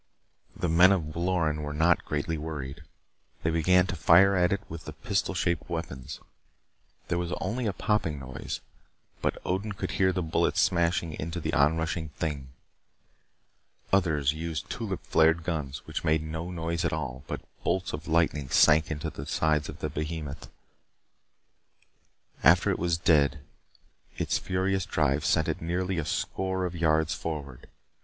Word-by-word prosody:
The 90 - -1
men 85 +3 +6
of 80 -6 -1
Loren 85 -3 0
were 75 0 -4
not 80 +2 +3
greatly 75 +2 -2
worried. 75 -4 -5 0.6
They 80 - +1
began 90 +3 +4
to 95 - -3
fire 90 +5 +6
at 90 -1 +3
it 100 - 0
with 80 0 -8
the 75 - -7
pistol 100 +5 -1
shaped 85 0 -1
weapons. 80 -6 -5 0.9
There 85 - 0
was 90 0 -2
only 115 +5 -2
a - - +1
popping 95 -9 0
noise, 65 -2 -6 0.6
but - - 0
Odin 100 +3 -1
could 95 - -4
hear 95 0 +3
the 90 -1 -1
bullets 80 - +1
smashing 85 -2 +2
into 85 +3 -3
the - - -3
onrushing 80 +2 +1
thing. 75 -5 -3 1.5
Others 80 -7 +3
used 80 -1 -4
the - - -2
tulip - - -4
flared 80 +1 +3
guns, 75 -5 -3
which - - -4
made 80 0 +2
no 80 +2 -5
noise 85 -1 -2
at 85 - +1
all, 65 0 -4
but - - -4 0.2
bolts 95 0 0
of - - -6
lightning 80 -4 +1
sank 80 +3 +5
into 75 -2 -3
the - - -8
sides 75 -1 +1
of - - -9
the - - -1
behemoth. 75 -2 -5 1.9
After - - +6
it - - -2
was 85 -1 +1
dead 75 -4 +3 0.7
its - - 0
furious 95 0 -1
drive 75 -1 +1
sent - - +2
it - - -2
nearly 90 +2 -1
a 80 - -2
score 95 +3 -1
of 90 -1 -4
yards 80 -1 +2
forward. 70 -6 -6
80 Hz, 160 wpm, -28 LUFS, 75-90 Hz, 1.9 s, men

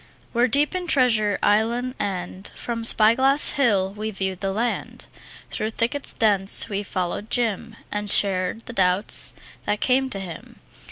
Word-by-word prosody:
We're 240 +1 +3
deep 285 +7 +2
in 365 -1 -4
Treasure 225 -8 +2
Island, 235 +4 +1
and 185 0 -4
From 230 -1 -5
Spy 220 -1 +6
Glass 270 +4 +4
Hill 200 -8 +1
we've 215 -1 -6
viewed 190 -1 -3
the 195 -1 -2
land; 230 +5 -4 0.5
Through 215 - -2
thickets 235 +5 -2
dense 200 -4 +1
we've 200 0 -4
followed 185 +3 -4
Jim 230 -2 -2 0.2
And 210 0 -4
shared 195 +2 +2
the 235 - -8
doubts 185 -1 +2 0.3
that 210 - 0
came 265 +1 +1
to 200 - -4
him. 180 -4 -10
215 Hz, 155 wpm, -23 LUFS, 195-240 Hz, 0.5 s, Spy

